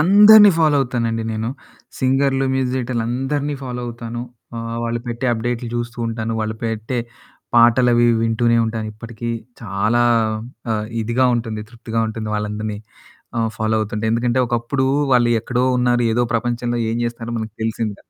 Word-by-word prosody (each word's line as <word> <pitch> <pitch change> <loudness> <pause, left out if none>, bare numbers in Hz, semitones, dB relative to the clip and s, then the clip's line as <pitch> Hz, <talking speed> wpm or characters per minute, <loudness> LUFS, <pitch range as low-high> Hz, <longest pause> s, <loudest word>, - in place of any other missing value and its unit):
అందరిని 205 +4 +8
ఫాలో 155 -3 +4
అవుతానండి 115 -3 -1
నేను. 110 +1 -2 0.5
సింగర్లు 135 +1 +2
మ్యూజిక్ 130 -1 0
డైరెక్టర్లు 120 -3 -1
అందరిని 140 +3 -1
ఫాలో 125 -1 -5
అవుతాను, 120 0 -6 0.4
ఆహ్, 115 0 -4
వాళ్ళు 115 0 -2
పెట్టే 120 +2 -3
అప్డేట్లు 120 +1 -2
చూస్తూ 120 0 -4
ఉంటాను. 115 0 -3
వాళ్ళు 110 0 -2
పెట్టే 115 +2 -2 0.6
పాటలవి 120 0 +5 0.2
వింటూనే 115 +1 +2
ఉంటాను. 110 -1 -3
ఇప్పటికీ 115 +1 -7 0.3
చాలా 105 +3 +1 0.7
ఆ! - - +2 0.3
ఇదిగా 120 +3 +2
ఉంటుంది 115 -2 -3
తృప్తిగా 115 -1 -3
ఉంటుంది 110 0 -5
వాళ్ళందరిని 105 0 -3 0.6
ఆహ్, 115 -1 +1
ఫాలో 110 0 0
అవుతుంటే 105 +1 -3
ఎందుకంటే 120 +2 +1
ఒకప్పుడు 120 +3 0 0.3
వాళ్ళు 120 -1 +4
ఎక్కడో 125 +2 0
ఉన్నారు 120 0 +2
ఏదో 120 +1 +2
ప్రపంచంలో 120 0 -1
ఏం 115 - -1
చేస్తారో 120 0 -4
మనకు 110 -1 -6
తెలిసింది 110 -1 -2
కాదు. - - -27
120 Hz, 145 wpm, -20 LUFS, 115-125 Hz, 0.7 s, అందరిని